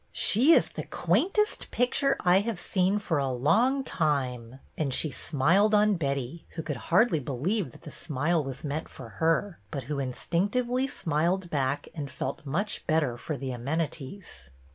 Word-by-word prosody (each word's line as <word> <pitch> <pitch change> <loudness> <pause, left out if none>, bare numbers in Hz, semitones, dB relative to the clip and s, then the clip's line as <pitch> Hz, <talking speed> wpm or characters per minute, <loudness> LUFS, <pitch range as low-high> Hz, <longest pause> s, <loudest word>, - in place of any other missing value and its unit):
" - - -40 0.2
She 260 +11 +6
is - - +4
the - - -6
quaint 390 +4 0
est 425 0 +1
picture 275 +3 +1
I 180 +1 +5
have 220 0 -2
seen 190 +2 +1
for 175 -7 -1
a 135 -1 0
long 225 - +2
time; 130 - -1
" - - -35
and 145 -4 -1
she 150 +3 +1
smiled 180 +12 +3
on 210 0 +4
Betty, 140 -2 -3
who 160 - -4
could 150 -4 -3
hardly 180 -1 +4
believe 145 - -2
that - - -17
the - - -9
smile 155 +2 0
was 135 -1 -6
meant 150 +1 -3
for 125 -3 -10
her, 165 +3 +1
but 140 -4 -4
who 140 +3 -3
instinctively 205 - 0
smiled 175 - -1
back 140 0 -1
and 145 -4 -5
felt 140 +2 -5
much 195 +10 -2
better 155 -7 +2
for 145 +4 -5
the 135 -1 -4
amenities. 145 - -4
160 Hz, 175 wpm, -28 LUFS, 135-200 Hz, 0.2 s, She